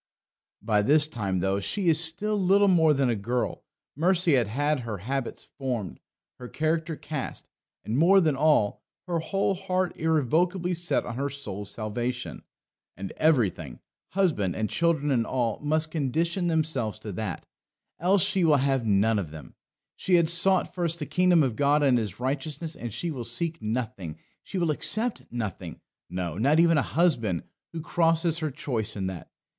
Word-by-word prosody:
By 105 -2 +2
this 145 +7 +4
time, 100 - -2
though 95 +1 +1
she 185 - -1
is 165 0 +5
still 200 +7 0
little 200 +1 +4
more 165 -4 +5
than 135 -2 +2
a 120 - +1
girl, 120 +5 -2 0.3
Mercy 175 +2 +2
had 135 +5 +1
her 115 -4 -5
habits 130 +6 -4 0.2
formed, 120 -9 -3 0.4
her 125 - -7
character 160 +3 -1
cast, 150 -2 -6 0.4
and, 115 +5 -1
more 190 +5 +6
than 155 -6 +2
all, 145 -8 +2 0.2
her 175 -2 -1
whole 195 +4 0
heart 185 -1 -2
irrevocably 165 +4 +1
set 175 0 -1
on 120 - -6
her 140 +1 -1
soul's 105 -8 -6
salvation. 120 +3 -4 0.6
And 95 0 -6
everything 110 - +1 0.3
husband 160 - +1
and 110 -1 -2
children 165 -4 +1
and 120 -4 +2
all 120 -3 -1
must 155 +1 0
condition 165 +5 0
themselves 160 -10 -1
to 110 -1 -7
that, 95 -2 -5 0.5
else 185 +1 +3
she 190 - +2
will 155 -3 +5
have 135 -2 +1
none 105 +2 +3
of 90 -6 -4
them. 80 0 -11 0.4
She 185 - +2
had 170 -2 +3
sought 185 +2 +2
first 170 -2 -1
the 150 - -4
kingdom 175 +2 +3
of 125 -5 -1
God 145 +2 +3
and 130 -4 +4
His 105 -2 -5
righteousness, 145 +5 -3
and 120 -1 -6
she 160 +10 -2
will 130 -5 -5
seek 160 +8 -2
nothing, 110 -7 -4 0.2
she 195 - -6
will 170 -3 +1
accept 220 +9 -1
nothing 110 -6 -5 0.3
no, 90 -1 -4
not 145 +7 +3
even 165 -2 +5
a - - -4
husband 115 - +2 0.3
who 165 - -5
crosses 165 0 +1
her 155 -2 -1
choice 125 -6 -3
in 95 -2 -3
that. 95 -2 -6
145 Hz, 170 wpm, -26 LUFS, 115-170 Hz, 0.6 s, more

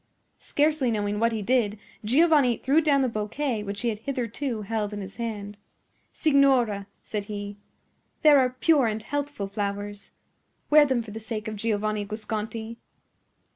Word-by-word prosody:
Scarcely 295 -3 +1
knowing 210 -2 -1
what 230 +1 +3
he 220 -2 -3
did, 220 -2 +1 0.3
Giovanni 275 0 +4
threw 285 +5 +3
down 285 -3 +3
the - - +2
bouquet 225 +2 -2
which 200 0 -5
he 240 - +1
had 210 -2 -3
hitherto 245 -2 -3
held 210 0 -2
in 205 - -4
his 195 0 -9
hand. 210 -3 -5 0.5
"Signora," 260 -9 +3 0.2
said 210 -2 -4
he, 205 -1 -6 0.7
"there 295 -2 +8
are 255 -1 +3
pure 260 +1 +3
and 215 0 -2
healthful 290 -6 -3
flowers. 200 0 -4 0.6
Wear 300 -1 +7
them 255 -3 0
for 220 - -10
the 220 - -6
sake 220 0 -5
of 215 - -4
Giovanni 215 -1 -1
Guasconti." 220 +2 -5
225 Hz, 155 wpm, -26 LUFS, 210-265 Hz, 0.7 s, there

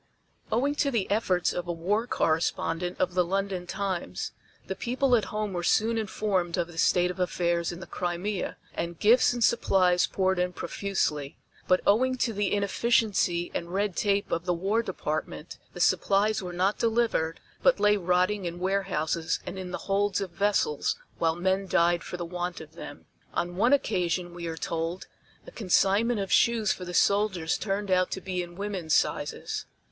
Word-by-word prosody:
Owing 275 +6 +2
to 280 - +2
the 230 -7 0
efforts 185 -4 +1
of 175 -1 -4
a - - -1
war 200 +8 -1
correspondent 165 0 0
of 180 -1 +1
the 180 0 +3
London 190 0 -2
Times, 185 - -3 0.3
the - - -3
people 250 +5 +1
at 220 - +1
home 210 -2 -3
were 175 - -2
soon 220 +6 +2
informed 195 -5 -1
of 175 - +1
the 165 -1 -9
state 180 +1 +3
of 180 - -10
affairs 175 -1 0
in 175 +1 -8
the - - -7
Crimea, 180 +3 -3 0.2
and 170 0 -4
gifts 230 +7 +5
and 240 -1 -1
supplies 185 -6 +3
poured 190 -1 0
in 180 0 0
profusely. 150 -9 -2 0.3
But 185 -1 +4
owing 255 +5 +3
to 235 -2 0
the 205 -1 0
inefficiency 200 -4 +1
and 170 0 -4
red 200 0 -1
tape 200 -1 0
of 170 +1 -1
the 180 -1 +1
War 195 +6 +1
Department, 155 -5 -4
the - - -9
supplies 200 +4 +2
were 180 -1 -5
not 185 +4 0
delivered, 225 -8 +1 0.2
but 265 -5 +4
lay 210 0 +4
rotting 185 +1 +1
in 170 0 -4
warehouses 180 -4 -1
and 185 +1 -6
in 185 -1 -6
the 180 - -3
holds 200 0 +1
of 195 -3 -4
vessels 205 - +1 0.2
while 165 -1 +2
men 190 +2 0
died 170 -1 +2
for 180 - -6
the 175 - -4
want 175 0 -4
of 155 -1 -12
them. - - -10 0.3
On 175 0 -1
one 230 +7 +3
occasion, 180 -9 +1
we 170 -1 -6
are 165 0 -4
told, 165 +2 -3 0.4
a - - -11
consignment 210 +3 +2
of 195 -2 -3
shoes 230 -2 +3
for 180 - -4
the 175 - -6
soldiers 200 -5 +2
turned 200 -1 -2
out 185 0 +3
to - - -4
be 185 -1 -3
in 175 0 -8
women's 190 -5 -1
sizes. - - -1
185 Hz, 180 wpm, -27 LUFS, 175-205 Hz, 0.4 s, gifts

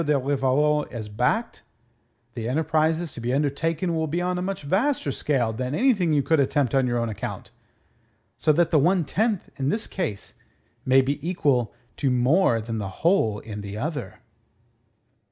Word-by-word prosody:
de 150 - +1
Rivarol 145 +2 +1
is 110 -4 -6
backed, 125 - -1 0.7
the 115 -1 -4
enterprises 160 +3 +1
to - - -8
be 120 +1 -1
undertaken 155 +5 0
will 160 0 0
be 165 +4 -2
on 180 0 -1
a - - -3
much 190 -3 -4
vaster 195 - 0
scale 125 -6 0
than 125 +5 -3
anything 210 -9 +2
you 145 -2 +2
could 160 +1 +2
attempt 140 -2 +1
on 135 -2 +3
your 120 0 0
own 115 0 0
account. 110 -1 -6 0.8
So 155 - +2
that 170 +2 +2
the 155 - +5
one 175 +3 +2
tenth 215 +3 -1
in 135 0 -1
this 215 +6 -1
case 155 - -5 0.5
may 130 +1 +6
be 135 +2 -2
equal 140 - +1 0.3
to 140 - +1
more 125 0 +3
than 110 0 -4
the 100 -2 -4 0.2
whole 140 - +3
in 105 -2 -7
the 100 0 -7
other." 140 - -4
145 Hz, 170 wpm, -24 LUFS, 125-165 Hz, 0.8 s, may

